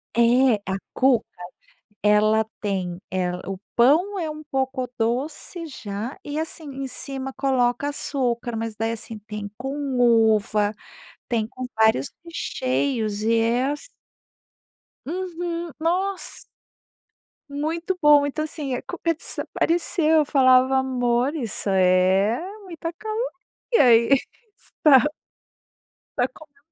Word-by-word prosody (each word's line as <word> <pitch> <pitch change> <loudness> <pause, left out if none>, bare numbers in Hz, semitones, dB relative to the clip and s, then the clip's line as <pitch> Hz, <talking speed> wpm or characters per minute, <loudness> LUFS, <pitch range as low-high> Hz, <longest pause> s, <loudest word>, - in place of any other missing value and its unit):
É, 235 +1 +5 0.2
a 190 - 0 0.2
cuca 255 -3 +3 0.8
ela 215 +1 +4 0.2
tem 185 -4 -2
ela 180 -1 -1
o 195 - -4 0.2
pão 325 +12 +4
é 325 -3 -2
um 305 0 -8
pouco 265 -2 -2
doce, 285 +8 -2
já, 220 -3 -6
e, 295 +1 -4
assim, 320 +1 -4
em 275 0 -4
cima 270 +1 -4
coloca 265 0 +1
açúcar, 245 -5 -2
mas 225 -1 -4
daí 225 +1 -1
assim 225 0 -7
tem 210 -1 -7
com 270 +2 -4 0.2
uva, 220 -3 +3 0.6
tem 230 -3 0
com 255 +2 -7
vários 220 -11 +3
recheios 255 -9 -2
e 225 +1 +2
é 235 +3 +2
as 295 +10 -5 1.2
Uhum, 345 0 -4
nossa. 365 +4 -2 1.1
Muito 325 +6 -2
bom. 295 -1 +6
Então, 285 +2 -2
assim, 295 -4 -4
a - - -4
cuca 335 -1 -2
desapareceu, 325 0 0
eu 300 - +2
falava: 260 -1 +5
"Amor 250 +1 +1
isso 230 -8 -2
é 190 +3 +3 0.3
muita 335 -2 -6
caloria, 435 +7 -3 0.6
aí. 235 -1 +6 0.7
tá". 290 -1 +7 1.1
Está 245 - +3
comen 290 -3 -17
260 Hz, 115 wpm, -23 LUFS, 225-305 Hz, 1.2 s, tá